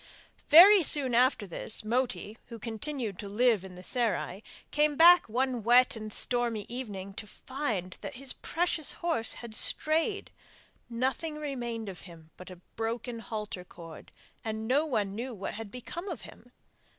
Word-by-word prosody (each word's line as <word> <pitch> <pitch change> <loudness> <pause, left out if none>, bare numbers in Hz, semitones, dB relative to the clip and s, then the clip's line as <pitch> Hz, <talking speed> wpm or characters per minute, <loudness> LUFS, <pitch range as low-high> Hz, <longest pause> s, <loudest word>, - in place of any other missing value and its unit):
Very 375 +6 +9
soon 280 -5 +3
after 245 -2 +3
this, 205 +4 +1
Moti, 240 -2 -2
who 230 - -9
continued 230 -1 -4
to 200 - -6
live 225 -1 +2
in 190 -1 -10
the 180 - -11
serai, 210 -3 -2 0.3
came 300 0 +2
back 345 -2 +7
one 250 +1 -1
wet 245 +3 +4
and 215 -1 -7
stormy 235 -2 -1
evening 205 -6 -6
to 210 +1 -8
find 220 -9 -4
that - - -7
his 270 +1 -2
precious 335 -3 -1
horse 330 -10 -1
had 235 -2 -10
strayed. 325 - +2 0.6
Nothing 260 +6 -2
remained 240 -7 -5
of 190 -2 -8
him 165 -1 -15
but 180 - -12
a 185 - -9 0.2
broken 230 +1 -4
halter 210 -5 -6
cord, 165 -2 -13 0.3
and 220 0 -4
no 285 +6 +2
one 205 -8 -1
knew 240 +3 -5
what 195 - -5
had 220 -1 -7
become 335 - -7
of 330 -9 -6
him. 245 - -15
235 Hz, 160 wpm, -29 LUFS, 210-270 Hz, 0.6 s, Very